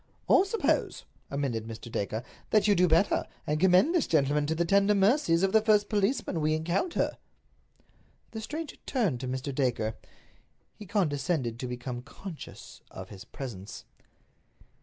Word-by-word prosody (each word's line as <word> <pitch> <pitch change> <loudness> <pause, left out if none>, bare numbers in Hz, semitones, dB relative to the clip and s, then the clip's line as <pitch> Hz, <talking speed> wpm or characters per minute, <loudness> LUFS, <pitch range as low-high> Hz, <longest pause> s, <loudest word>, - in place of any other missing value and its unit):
"Or 380 - +5
suppose," 435 +3 0 0.2
amended 130 -6 -2
Mr. 115 +1 -8
Dacre, 110 +3 -2 0.3
"that 215 -1 +3
you 205 - +6
do 180 -2 +4
better, 170 +4 +3 0.2
and 150 +1 0
commend 190 - +5
this 345 -5 +2
gentleman 145 -2 +2
to 160 - 0
the 170 +1 +1
tender 200 +3 +4
mercies 195 - +3
of 195 - +3
the 220 - +5
first 210 -1 +3
policeman 205 - 0
we 155 +1 +2
encounter." 175 - -1 1.1
The 220 - -6
stranger 305 +7 -6
turned 210 - 0
to 130 - -5
Mr. 130 +2 -3
Dacre. 120 -5 0 0.8
He 210 - -12
condescended 150 - 0
to 125 - -3
become 125 0 -5
conscious 160 +5 -10
of 95 0 -9
his 95 -3 -10
presence. 105 -8 -8
160 Hz, 150 wpm, -29 LUFS, 125-205 Hz, 1.1 s, you